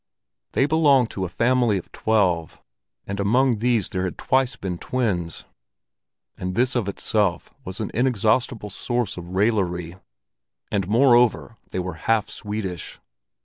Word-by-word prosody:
They 135 - +3
belonged 145 -6 +4
to 95 - -3
a - - -5
family 120 +1 +2
of 90 - -8
twelve, 90 -7 0 0.5
and 100 0 -5
among 120 +3 +2
these 115 -3 +1
there 95 0 -2
had 90 - -4
twice 130 -1 +1
been 95 -6 -5
twins, 100 -10 -2 0.9
and 90 0 -4
this 125 +4 +2
of 110 -5 0
itself 100 -2 -1
was 95 +1 -7
an 110 - -3
inexhaustible 115 -2 +1
source 120 0 -2
of 85 -1 -8
raillery; 95 -5 0 0.7
and 100 -3 0
moreover 120 0 +3
they - - -5
were 90 0 -2 0.2
half 115 -3 +2
Swedish. 105 -6 -5
105 Hz, 140 wpm, -23 LUFS, 95-120 Hz, 0.9 s, belonged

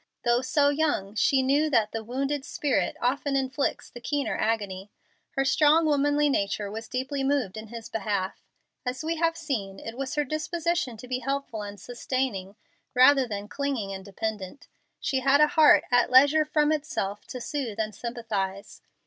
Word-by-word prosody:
Though 240 +1 +3
so 285 +2 +2
young, 285 -10 0
she 265 +5 +3
knew 285 +4 +2
that 225 -6 +2
the 225 0 -4
"wounded 270 +4 -2
spirit" 280 0 -1
often 275 +3 0
inflicts 265 +1 -1
the 240 - -10
keener 285 +3 -1
agony. 205 -3 -2 0.5
Her 270 -1 +1
strong 305 +4 +4
womanly 290 0 +2
nature 200 -5 -1
was 225 +1 -6
deeply 265 +2 -3
moved 270 -8 0
in 220 0 -7
his 230 0 -8
behalf. 200 -3 -2 0.4
As 255 +3 -4
we 325 +1 -1
have 330 0 +1
seen, 220 -12 -4
it 225 - -7
was 270 +3 -4
her 295 - +2
disposition 310 -2 -2
to 250 - -10
be 255 0 -2
helpful 275 -5 -3
and 205 -1 -7
sustaining, 240 -3 -3 0.4
rather 260 +1 +6
than 205 -2 -5
clinging 260 -7 -3
and 190 0 -7
dependent. 205 +3 -5 0.3
She 265 - 0
had 275 +2 +4
a 300 0 +6
heart 310 -1 +6
"at 245 -1 +4
leisure 285 +4 +6
from 300 -1 +2
itself, 210 -10 -3
to 250 - -6
soothe 245 -5 -4
and 215 -1 -1
sympathize." 210 -5 -4
255 Hz, 170 wpm, -27 LUFS, 215-285 Hz, 0.5 s, rather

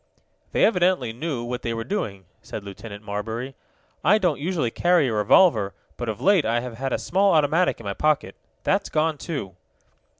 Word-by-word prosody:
"They - - +4
evidently 180 - +2
knew 130 -1 -3
what 125 +1 -4
they 115 -1 -2
were 115 - -3
doing," 105 - -4 0.2
said 105 - -7
Lieutenant 100 +1 -9
Marbury. 110 +5 -4 0.5
"I 190 +9 +5
don't 180 -9 0
usually 155 -6 -1
carry 175 -2 +3
a - - -2
revolver, 105 - +4 0.2
but 120 -2 -4
of 105 - -4
late 195 -4 +4
I 115 0 +1
have 120 -1 -7
had 135 0 -2
a - - +1
small 195 +2 +2
automatic 160 +3 +2
in - - -10
my 100 - -2
pocket. 150 +6 0 0.3
That's - - +1
gone, 155 -1 0
too." 105 - -5
130 Hz, 185 wpm, -24 LUFS, 110-170 Hz, 0.5 s, I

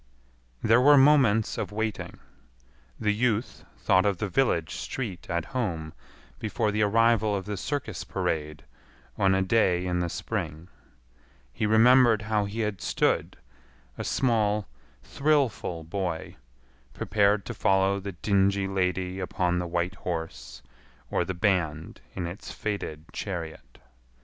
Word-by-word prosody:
There 115 +3 +5
were 145 +2 +7
moments 135 -6 +4
of - - -3
waiting. 110 0 -3 0.8
The 105 -1 +1
youth 115 0 -1
thought 95 0 +3
of 100 -3 +1
the 105 - -2
village 90 - +1
street 105 -9 -5
at 85 -1 -1
home 85 -11 -2 0.5
before 110 0 -1
the 105 +1 0
arrival 110 0 +3
of 95 -2 -4
the 105 0 -3
circus 140 +8 -4
parade 75 -3 -3 0.5
on 95 -1 +3
a 95 - +2
day 95 -3 +2
in 90 -1 0
the 85 -1 -1
spring. 80 +1 -4 0.8
He 105 - -1
remembered 115 0 +5
how 105 -1 0
he 105 +3 -4
had 105 -3 -2
stood, - - 0 0.6
a - - -5
small, 105 -5 +1 0.4
thrillful 135 - 0
boy, 85 0 -4 0.6
prepared 100 -1 +2
to - - -5
follow 95 0 +2
the 100 0 -6
dingy 100 +1 +1
lady 95 -1 -1
upon 90 -1 0
the 90 - -3
white 85 +2 -1
horse, 80 -8 -5 0.5
or - - +1
the 95 - -4
band 85 -5 -1
in 90 - -3
its 85 +4 -7
faded 90 -7 -4
chariot. 85 -5 -6
100 Hz, 135 wpm, -27 LUFS, 90-110 Hz, 0.8 s, were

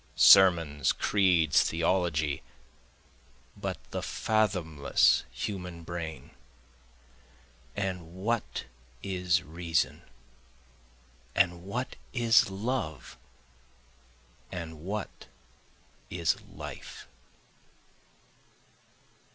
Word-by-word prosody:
Sermons, 85 -7 +6
creeds, 85 -8 +3
theology 80 -3 0 1.1
but - - -4
the - - -3
fathomless 90 -10 +2
human 90 -4 -5
brain, 80 -2 -6 1.4
And 90 -4 -4
what 110 +4 -2 0.4
is 90 -1 +1
reason? 80 0 -1 1.3
and 90 -2 +2
what 125 +7 -4 0.2
is 115 -4 +4
love? 95 - -3 1.4
and 80 -3 -6
what 100 +2 -5 0.8
is 85 -3 0
life? - - -9
90 Hz, 60 wpm, -29 LUFS, 80-95 Hz, 1.4 s, Sermons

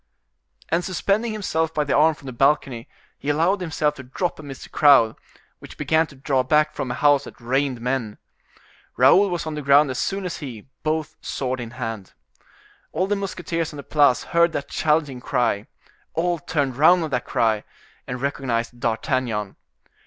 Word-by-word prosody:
And 170 +2 +1
suspending 200 +5 0
himself 160 -6 -1
by 150 - +2
the 145 - 0
arm 155 +1 +4
from 140 - -17
the 130 - -5
balcony, 135 -2 +1 0.3
he 145 - -4
allowed 170 +6 +2
himself 155 -3 0
to 135 - -10
drop 155 +8 -3
amidst 140 -3 -9
the - - -12
crowd, 140 -7 +5 0.4
which - - -12
began 160 0 +2
to 140 - -15
draw 135 0 0
back 150 +4 +2
form 130 - -4
a 120 - -2
house 145 -1 +3
that - - -12
rained 130 +1 0
men. 120 -3 -2 0.8
Raoul 200 +1 +6
was 175 -2 -3
on 160 - -4
the 150 - -4
ground 140 0 +5
as 125 - -4
soon 195 -1 -2
as 180 - -4
he, 120 -8 -8 0.2
both 155 0 -2
sword 130 -1 -3
in 120 -2 -5
hand. 115 -6 -5 0.8
All 185 - 0
the 205 +1 0
musketeers 170 -5 -3
on - - -8
the 140 - -7
Place 145 -4 +3
heard 170 0 +2
that 140 - -4
challenging 150 -5 0
cry—all 160 +10 -2
turned 145 -6 -2
round 170 +4 +5
at 155 - -4
that 125 -2 -1
cry, 110 -2 +1 0.4
and 125 0 -4
recognized 120 -3 -2
D'Artagnan. 115 -3 -1
145 Hz, 175 wpm, -23 LUFS, 125-160 Hz, 0.8 s, Raoul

